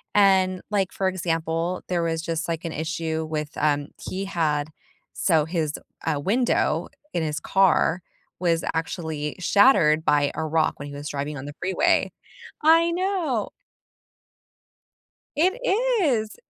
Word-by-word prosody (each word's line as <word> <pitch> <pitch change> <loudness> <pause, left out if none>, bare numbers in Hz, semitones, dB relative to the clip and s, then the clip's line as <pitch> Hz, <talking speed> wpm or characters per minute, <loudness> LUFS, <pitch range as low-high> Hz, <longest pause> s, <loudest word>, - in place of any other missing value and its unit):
And, 190 -2 +4
like, 195 -3 0
for 190 -1 0
example, 165 -1 -2
there 175 -2 +1
was 165 -1 -1
just, 165 -1 -3
like, 165 +1 -3
an 165 - -3
issue 160 0 -3
with, 150 -1 -3
um 145 -1 +1
he 190 +1 -4
had 155 -5 0 0.4
so, 160 -5 +2
his, 160 -2 -2 0.3
uh, 155 -2 +1
window 235 - +1 0.3
in 170 - 0
his 150 -1 -2
car 190 -2 +3 0.4
was 170 -2 +1
actually 160 -2 -3
shattered 170 - +4
by 145 -1 +3
a 160 +1 -3
rock 155 0 0
when 140 - -6
he 145 - -9
was 145 +1 -6
driving 145 +1 -4
on 130 - -7
the 145 - -7
freeway. 190 +1 +2 0.5
I 330 +2 +5
know! 345 - -1 1.9
It 355 +6 +3 0.5
is! 225 -8 0
165 Hz, 140 wpm, -24 LUFS, 155-195 Hz, 1.9 s, I